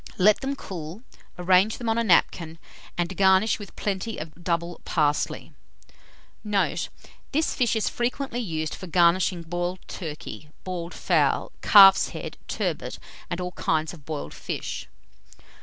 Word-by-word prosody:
Let 205 +3 +5
them 275 +1 -2
cool, 180 - -7 0.3
arrange 185 +4 +3
them 240 - -5
on 225 +1 +2
a - - +2
napkin, 170 -4 +2 0.4
and 175 +2 -1
garnish 190 +3 +4
with 205 - -10
plenty 210 +2 -3
of 155 0 -7
double 170 0 -2
parsley. 150 -3 0 0.9
Note. 210 -2 0 0.4
This 310 +3 +1
fish 245 -3 +1
is 220 - 0
frequently 245 +1 -2
used 160 -8 -3
for 185 - -7
garnishing 175 +1 +3
boiled 175 +2 -2
turkey, 155 -2 -7
boiled 180 -2 -5
fowl, - - +1
calf's 195 -2 +8
head, - - -7
turbot, - - -3 0.3
and 170 - -3
all 180 0 -3
kinds 160 -2 -1
of 160 -4 -13
boiled 150 0 -5
fish. - - -5
185 Hz, 140 wpm, -25 LUFS, 170-210 Hz, 0.9 s, calf's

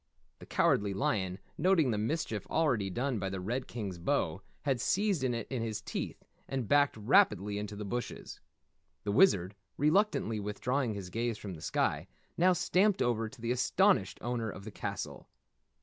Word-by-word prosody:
The - - -12
Cowardly 100 -1 +2
Lion, 95 -2 0 0.2
noting 175 -8 +4
the 105 - 0
mischief 110 - -2
already 125 -12 +1
done 120 +4 -1
by 95 0 -2
the 95 0 -4
Red 120 +8 -3
King's 100 -7 -5
bow, 85 - 0 0.2
had 135 -5 0
seized 195 - +1
it 120 -4 -1
in 130 -3 -3
his 110 -2 -2
teeth 105 - -5 0.3
and 130 -5 -2
backed 145 -2 +3
rapidly 105 - +3
into 105 0 -5
the 105 0 -5
bushes. 120 +4 -5 0.6
The 105 - -1
Wizard, 100 - +4 0.2
reluctantly 150 - +2
withdrawing 115 +4 -1
his 95 -3 -7
gaze 115 -1 -1
from 100 -3 -7
the 80 - -10
sky, - - 0 0.3
now 180 +2 +4
stamped 190 +3 +2
over 115 -2 0
to 135 - -15
the 115 +1 -1
astonished 125 - +2
owner 120 -1 -1
of 100 - -8
the 110 - -7
castle. - - -5
115 Hz, 165 wpm, -32 LUFS, 100-140 Hz, 0.6 s, noting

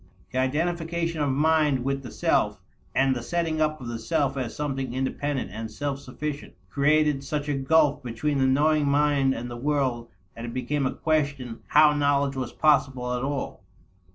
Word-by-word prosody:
The 130 - -1
identification 165 +3 -1
of 145 - +1
mind 150 -1 +2
with 135 +1 -1
the 125 - -8
self, - - +1 0.4
and 135 -1 +3
the 120 - -3
setting 160 +3 -1
up 155 0 +1
of 125 - -8
the 115 -1 -4
self 140 +5 0
as 130 -4 -4
something 135 -4 -3
independent 135 0 -2
and 110 +1 -5
self 140 +1 -3
sufficient, 145 +2 -6 0.2
created 150 0 +2
such 145 +1 -3
a 145 - 0
gulf 145 +2 +3
between 130 +4 -2
the 130 - +3
knowing 150 +2 +3
mind 140 -2 +2
and 120 +1 -5
the 120 -1 -7
world 130 -3 -1 0.3
that 115 - -8
it 120 0 -6
became 130 +2 0
a - - -2
question 145 -7 -1
how 150 0 +6
knowledge 140 -1 +1
was 130 -2 -3
possible 135 -5 +2
at 125 - -2
all. 140 0 -4
140 Hz, 180 wpm, -26 LUFS, 130-150 Hz, 0.4 s, how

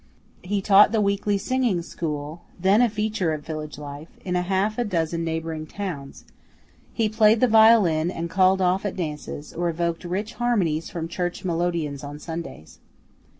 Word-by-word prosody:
He 195 +1 -2
taught 205 +1 +6
the 225 - +1
weekly 200 0 +1
singing 225 -4 0
school 155 -1 -5 0.2
(then 195 +5 +4
a 245 - +4
feature 210 -5 -1
of 150 -1 -6
village 155 -2 -6
life) 145 +1 -8 0.2
in 180 - -2
half 190 +5 0
a - - +2
dozen 170 -5 -1
neighboring 160 -1 -3
towns, 170 -10 -6 0.7
he 225 -2 0
played 215 +1 +4
the 255 - +4
violin 220 -8 +5
and 170 -2 -4
"called 185 +2 +3
off" 185 +1 +2
at 205 - -3
dances, 150 -3 -5
or 175 +1 -1
evoked 170 0 -2
rich 195 +5 -3
harmonies 180 -10 +1
from 165 -1 -4
church 175 +2 -4
melodeons 165 -5 -1
on 145 +1 -7
Sundays. 160 - -8
175 Hz, 160 wpm, -24 LUFS, 160-205 Hz, 0.7 s, taught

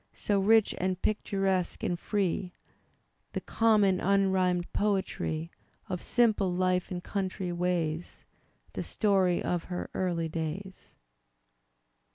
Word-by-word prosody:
So 205 -1 0
rich 220 +2 +4
and 185 0 -1
picturesque 195 -3 0
and 175 -1 -1
free, 190 -2 -1 0.8
(The - - -2
common 210 -5 +3
unrhymed 190 -2 +2
poetry 190 -5 -1 0.4
Of 180 -2 -3
simple 220 -6 +2
life 180 0 +1
and 175 -1 -5
country 190 -2 -3
ways). 175 -2 -2 0.5
The - - -3
story 190 -4 +2
of 175 -1 -1
her 180 -1 -5
early 175 -3 -1
days. 165 +4 -6
185 Hz, 110 wpm, -29 LUFS, 175-200 Hz, 0.8 s, rich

